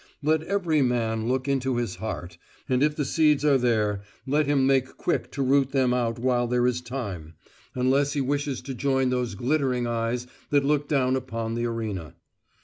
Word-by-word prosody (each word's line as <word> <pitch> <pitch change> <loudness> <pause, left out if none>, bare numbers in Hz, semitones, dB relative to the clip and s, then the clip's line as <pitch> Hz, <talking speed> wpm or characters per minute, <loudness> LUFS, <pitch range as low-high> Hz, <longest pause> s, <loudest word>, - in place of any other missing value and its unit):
Let 155 +1 +2
every 170 -4 +1
man 115 -3 0
look 130 +2 0
into 135 -2 0
his 120 -6 -2
heart, 90 -6 -6 0.3
and 130 0 +1
if 150 +1 +2
the 145 - -1
seeds 150 0 +3
are 140 -3 +4
there 105 -5 +1 0.2
let 145 +2 +1
him 140 -2 +3
make 130 -1 +1
quick 175 - -1
to 140 - -1
root 135 0 +2
them 130 -2 +3
out 120 -2 0
while 120 0 +1
there 125 0 +1
is 125 0 +1
time; 100 - -6 0.4
unless 135 +3 +2
he 145 - -1
wishes 140 0 -1
to 135 +1 -6
join 135 0 +1
those 125 -4 -1
glittering 130 +1 0
eyes 120 +1 -1 0.2
that 145 -1 +3
look 145 0 +1
down 130 -3 +2
upon 115 -3 -3
the 120 +1 -1
arena. 105 - -4
130 Hz, 185 wpm, -26 LUFS, 120-140 Hz, 0.4 s, are